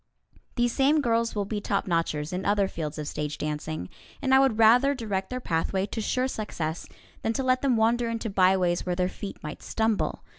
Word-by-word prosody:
These 240 -1 +1
same 285 +3 +3
girls 230 -4 +1
will 205 -1 -1
be 210 +1 -3
topnotchers 165 -6 -1
in 185 +1 -2
other 200 -1 +2
fields 160 -4 -5
of 150 -1 -4
stage 150 0 -3
dancing, 150 - -4 0.3
and 265 -1 +1
I 265 - +8
would 265 -5 +3
rather 245 +5 +5
direct 200 -6 -3
their 255 - -3
pathway 190 -1 -1
to 220 +2 -4
sure 255 +4 0
success 175 -9 -4 0.3
than 225 - 0
to 265 - -1
let 255 0 +2
them 260 -4 +2
wander 230 +2 +2
into 230 0 -3
byways 185 -3 +2
where 180 -1 -1
their 180 0 +1
feet 200 +1 -7
might 150 - -7
stumble. 220 -1 -1
210 Hz, 195 wpm, -27 LUFS, 175-240 Hz, 0.3 s, I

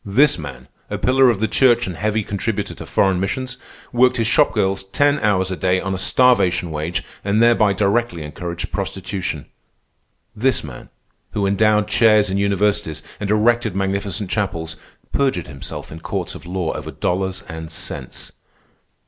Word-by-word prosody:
This 125 - +3
man, 70 -4 -8 0.2
a - - -2
pillar 130 0 +4
of 115 -5 +1
the 110 - +1
church 120 -1 +4
and 90 - -5
heavy 110 +3 0
contributor 105 +1 -3
to - - -10
foreign 95 -2 +2
missions, 125 +6 -3 0.4
worked 125 +1 +4
his 115 - +1
shop 150 +6 +4
girls 95 -3 0
ten 145 +9 +2
hours 95 -3 +1
a - - -1
day 90 0 +1
on 95 0 -3
a 95 - -3
starvation 95 -8 +3
wage 80 +4 -2 0.2
and 100 +2 +1
thereby 115 -3 +4
directly 100 -3 0
encouraged 85 +3 -5
prostitution. 95 -6 -4 0.9
This 130 +5 +1
man, 70 -6 -10 0.4
who 100 - 0
endowed 105 +1 +3
chairs 110 -3 +4
in 95 - 0
universities 100 -5 0 0.2
and 100 - -3
erected 110 0 +2
magnificent 100 0 -2
chapels, 85 -4 -2 0.4
perjured 135 -11 0
himself 70 -2 -8
in 80 - -8
courts - - -3
of - - -11
law 90 -2 -2
over - - -6
dollars 95 +2 -2
and 80 -2 -7
cents. - - -7
100 Hz, 160 wpm, -20 LUFS, 90-110 Hz, 0.9 s, pillar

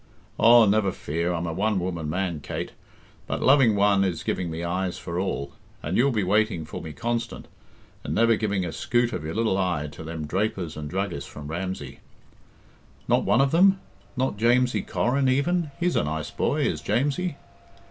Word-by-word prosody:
"Aw, 115 0 +7
never 100 -1 +2
fear! 85 +3 -2
I'm 85 0 -2
a 85 - -3
one 105 +4 0
woman 85 -4 -3
man, 90 -1 -2
Kate; 70 - -5 0.6
but - - -2
loving 130 -5 +5
one 100 -1 +4
is 85 -4 -2
giving 90 -2 -2
me 80 +1 -4
eyes 90 +1 -2
for 85 0 -4
all. 70 -7 -3 0.3
And 85 +5 -2
you'll 135 +4 +4
be 110 -6 0
waiting 100 -3 +1
for - - -7
me 80 - -7
constant, 115 +7 -3 0.6
and - - -3
never 115 0 +4
giving 100 -4 -1
a 85 - -4
skute 120 +5 0
of - - -4
your 80 +3 -5
little 110 -4 +1
eye 85 -6 -1
to 80 - -9
them 80 -1 -5
drapers 95 -1 -2
and 75 -1 -6
druggists 90 -5 -3
from 75 0 -9
Ramsey 85 -5 -5 0.5
" - - -30
"Not - - +2
one 120 - +4
of 135 0 +2
them? 190 +3 +5 0.4
Not 130 -5 0
Jamesie 125 +3 +3
Corrin, 135 +2 +1
even 160 +5 +1
he's 175 0 +1
a - - +2
nice 80 +1 -3
boy, - - 0
is - - 0
Jamesie." 145 +6 0
95 Hz, 190 wpm, -25 LUFS, 85-120 Hz, 0.6 s, Aw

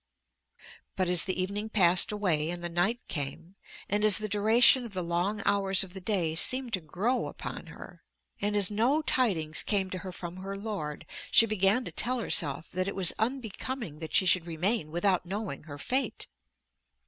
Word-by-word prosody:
But 185 -2 0
as 180 -2 +2
the 185 -1 -2
evening 200 +4 -3
passed 185 -4 +4
away 175 -7 0
and 175 0 -5
the 175 - -2
night 185 +9 -1
came, 150 +5 -5 0.3
and 205 +1 0
as 215 -2 +6
the 215 - -3
duration 225 +5 +4
of 230 -4 -9
the 185 -1 -3
long 180 +5 -2
hours 195 -1 +3
of 185 -2 -10
the 190 - -8
day 180 -5 0
seemed 250 +8 +2
to 185 - 0
grow 200 +11 -1
upon - - -8
her, - - -12 0.4
and 205 +1 0
as 205 -1 +2
no 250 +9 +1
tidings 170 - +1
came 195 -3 0
to 185 - -4
her 185 +2 -7
from 175 0 -8
her 195 +1 -6
lord, 195 -8 -5 0.2
she 230 - +6
began 210 +2 +1
to - - -4
tell 250 +3 +2
herself 155 -8 0
that 185 +1 -2
it 200 - -4
was 185 -3 +3
unbecoming 230 - -4
that 160 -1 -5
she 190 - +5
should 175 -1 +3
remain 170 +2 -1
without 180 +3 +1
knowing 190 -5 -5
her 145 -3 -9
fate. 260 - -2
195 Hz, 185 wpm, -29 LUFS, 175-215 Hz, 0.4 s, as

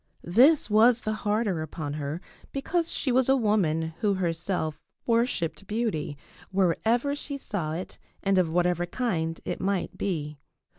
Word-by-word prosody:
This 275 - +6
was 225 +3 +5
the 215 - -1
harder 210 -5 0
upon 155 -1 -5
her 150 +3 -4 0.3
because 330 +5 -1
she 265 - 0
was 260 +1 +3
a 270 - +6
woman 170 -9 +1
who 205 -3 +2
herself 165 -3 -2 0.3
worshipped 230 -6 0
beauty 210 -10 -2 0.3
wherever 220 - +1
she 285 -1 -4
saw 175 - -3
it 175 +3 -6 0.2
and 195 -1 +3
of 175 -3 +2
whatever 175 +1 +1
kind 170 -7 -1
it 175 - -3
might 195 -1 -1
be. 150 -6 -2
195 Hz, 145 wpm, -27 LUFS, 165-235 Hz, 0.3 s, This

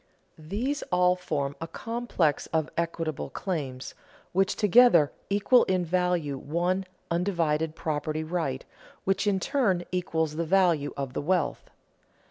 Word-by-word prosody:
These 215 - -2
all 180 0 +4
form 145 -6 -3
a 165 - -3
complex 220 - -1
of 160 -2 -1
equitable 165 -3 -2
claims, 140 -9 -4 0.4
which 195 +2 +2
together 210 - +5 0.2
equal 205 +5 +4
in 185 -2 0
value 175 -5 0
one 175 +6 -1 0.3
undivided 165 -3 0
property 155 0 -2
right, 155 -5 -2 0.4
which 195 +2 0
in 195 -2 +2
turn 210 -9 +1
equals 160 -4 -1
the 170 - 0
value 170 -5 +3
of 135 -2 -4
the - - -2
wealth. 170 -1 -1
170 Hz, 125 wpm, -27 LUFS, 155-190 Hz, 0.4 s, together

